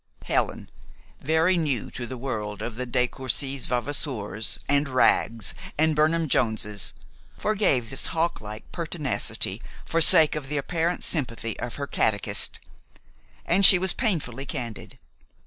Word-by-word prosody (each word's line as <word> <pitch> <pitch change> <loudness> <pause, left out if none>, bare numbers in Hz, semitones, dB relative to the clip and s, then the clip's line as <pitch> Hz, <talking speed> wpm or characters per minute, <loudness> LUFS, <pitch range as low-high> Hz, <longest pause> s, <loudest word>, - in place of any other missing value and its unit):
Helen, - - -1 0.5
very 160 +5 +2
new 145 -9 -2
to 120 +1 -7
a 130 - -5
world 105 -5 -5
of 120 - -5 0.2
de 125 -1 +2
Courcy 135 +2 -3
Vavasours, 120 -5 -3
and 145 0 +1
Wraggs, 115 -3 +1 0.2
and 155 0 +2
Burnham 160 +2 +2
Joneses, 110 -5 +1 0.4
forgave 195 - 0
this 135 - -5
hawklike 115 - -3
pertinacity 155 - 0 0.2
for 165 - 0
sake 155 0 +7
of 140 -3 -6
the 150 - -1
apparent 170 +4 -2
sympathy 115 - -2
of 120 - -5
her 140 - -4
catechist. 100 -7 0 0.9
And 200 - +2
she 190 - +12
was 185 0 0
painfully 140 - -2
candid. 120 -6 -6
135 Hz, 130 wpm, -25 LUFS, 115-160 Hz, 0.9 s, she